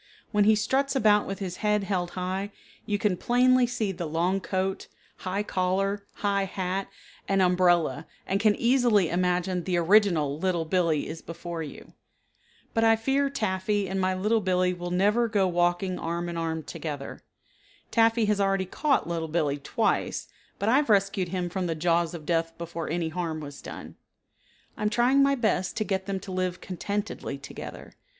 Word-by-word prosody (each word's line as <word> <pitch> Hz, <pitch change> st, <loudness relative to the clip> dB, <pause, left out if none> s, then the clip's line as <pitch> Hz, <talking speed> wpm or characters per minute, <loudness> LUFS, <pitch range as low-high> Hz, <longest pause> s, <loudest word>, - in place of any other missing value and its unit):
When 210 Hz, -2 st, +3 dB
he 215 Hz, +1 st, +6 dB
struts 265 Hz, +6 st, 0 dB
about 210 Hz, -4 st, +4 dB
with 195 Hz, -, -4 dB
his 185 Hz, -2 st, -5 dB
head 210 Hz, -1 st, +1 dB
held 185 Hz, -3 st, -1 dB
high 190 Hz, +3 st, -2 dB, 0.4 s
you 205 Hz, -, +1 dB
can 205 Hz, -3 st, +1 dB
plainly 250 Hz, +3 st, +4 dB
see 230 Hz, -4 st, -1 dB
the 175 Hz, -3 st, -5 dB
long 175 Hz, +5 st, 0 dB
coat, 190 Hz, 0 st, -2 dB, 0.3 s
high 190 Hz, +2 st, -2 dB
collar, 195 Hz, +1 st, -1 dB, 0.2 s
high 200 Hz, -1 st, +2 dB
hat, 190 Hz, 0 st, -3 dB, 0.4 s
and 195 Hz, 0 st, +2 dB
umbrella 175 Hz, -5 st, +3 dB, 0.2 s
and 195 Hz, -, 0 dB
can 210 Hz, 0 st, +4 dB
easily 235 Hz, -7 st, +3 dB
imagine 180 Hz, 0 st, 0 dB
the 180 Hz, -1 st, 0 dB
original 170 Hz, -6 st, +3 dB
Little 175 Hz, -2 st, 0 dB
Billee 165 Hz, -3 st, +1 dB
is 160 Hz, +1 st, -7 dB
before 170 Hz, 0 st, -6 dB
you. 150 Hz, -, -9 dB, 0.8 s
But 225 Hz, -, +2 dB
I 225 Hz, 0 st, +6 dB
fear 270 Hz, +5 st, +1 dB
Taffy 205 Hz, -5 st, -1 dB
and 190 Hz, +1 st, -2 dB
my 185 Hz, 0 st, +1 dB
Little 215 Hz, +4 st, +1 dB
Billee 180 Hz, -1 st, +1 dB
will 175 Hz, 0 st, -5 dB
never 205 Hz, +6 st, +2 dB
go 205 Hz, -4 st, +2 dB
walking 175 Hz, +1 st, 0 dB
arm 170 Hz, +1 st, -3 dB
and 170 Hz, -, -5 dB
arm 160 Hz, -1 st, -2 dB
together. 145 Hz, -3 st, -6 dB, 0.7 s
Taffy 225 Hz, 0 st, +4 dB
has 205 Hz, -1 st, +1 dB
already 195 Hz, -1 st, +1 dB
caught 275 Hz, -, 0 dB
Little 165 Hz, -1 st, -2 dB
Billee 150 Hz, -3 st, 0 dB
twice, 140 Hz, -, -1 dB, 0.3 s
but 200 Hz, -, -2 dB
I 245 Hz, +4 st, +5 dB
have 285 Hz, -3 st, +1 dB
rescued 195 Hz, -2 st, +2 dB
him 180 Hz, -1 st, -2 dB
from 180 Hz, +1 st, -2 dB
the 165 Hz, -, -1 dB
jaws 170 Hz, +1 st, +1 dB
of 155 Hz, -3 st, -9 dB
death 165 Hz, 0 st, 0 dB
before 170 Hz, -1 st, -5 dB
any 165 Hz, 0 st, -1 dB
harm 160 Hz, -1 st, -3 dB
was 145 Hz, -2 st, -9 dB
done. -, -, -9 dB, 0.8 s
I -, -, -10 dB
am 210 Hz, -, +2 dB
trying 245 Hz, +5 st, +3 dB
my 275 Hz, 0 st, +4 dB
best 215 Hz, -6 st, 0 dB
to 215 Hz, -, +1 dB
get 190 Hz, -2 st, -2 dB
them 195 Hz, -1 st, -2 dB
to 190 Hz, -, -8 dB
live 185 Hz, -1 st, -2 dB
contentedly 200 Hz, -5 st, -4 dB
together. 140 Hz, -, -9 dB
190 Hz, 175 wpm, -27 LUFS, 175-210 Hz, 0.8 s, he